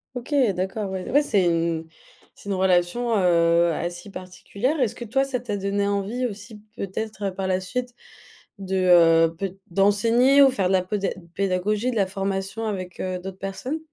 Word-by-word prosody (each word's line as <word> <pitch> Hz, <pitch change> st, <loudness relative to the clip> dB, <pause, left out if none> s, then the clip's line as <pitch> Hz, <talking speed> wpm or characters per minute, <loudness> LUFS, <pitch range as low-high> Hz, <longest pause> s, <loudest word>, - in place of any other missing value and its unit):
OK, 245 Hz, +3 st, -7 dB, 0.2 s
d'accord, 190 Hz, +2 st, -3 dB
ouais. 190 Hz, -1 st, -5 dB
Ouais, 290 Hz, +2 st, +4 dB
c'est 205 Hz, -9 st, +2 dB
une 165 Hz, -1 st, 0 dB, 0.5 s
c'est 205 Hz, -, -11 dB
une 195 Hz, -, 0 dB
relation, 190 Hz, +6 st, +1 dB
heu, 170 Hz, -2 st, +3 dB
assez 175 Hz, +4 st, -5 dB
particulière. 200 Hz, -, -4 dB
Est-ce 245 Hz, -5 st, +1 dB
que 240 Hz, -, -8 dB
toi 270 Hz, +5 st, +1 dB
ça 265 Hz, -2 st, -2 dB
t'a 225 Hz, -4 st, -4 dB
donné 200 Hz, +1 st, -1 dB
envie 205 Hz, +5 st, -1 dB
aussi 210 Hz, 0 st, -10 dB
peut-être 205 Hz, -1 st, -4 dB
par 190 Hz, 0 st, -4 dB
la 185 Hz, 0 st, +1 dB
suite 245 Hz, +6 st, -5 dB, 0.6 s
de, 190 Hz, -1 st, -3 dB, 0.6 s
heu, -, -, -20 dB
peut 195 Hz, +1 st, -5 dB
d'enseigner 230 Hz, +8 st, +4 dB
ou 270 Hz, -, +7 dB
faire 200 Hz, -8 st, 0 dB
de -, -, 0 dB
la 185 Hz, -, +3 dB
poda 195 Hz, +1 st, -2 dB, 0.3 s
pédagogie, 200 Hz, +5 st, 0 dB
de 240 Hz, -, -5 dB
la 200 Hz, -3 st, +2 dB
formation 195 Hz, +3 st, -3 dB
avec, 185 Hz, -4 st, -5 dB
heu, 185 Hz, -1 st, -2 dB
d'autres 190 Hz, +1 st, -8 dB
personnes? 195 Hz, +11 st, -4 dB
195 Hz, 175 wpm, -24 LUFS, 185-225 Hz, 0.6 s, ou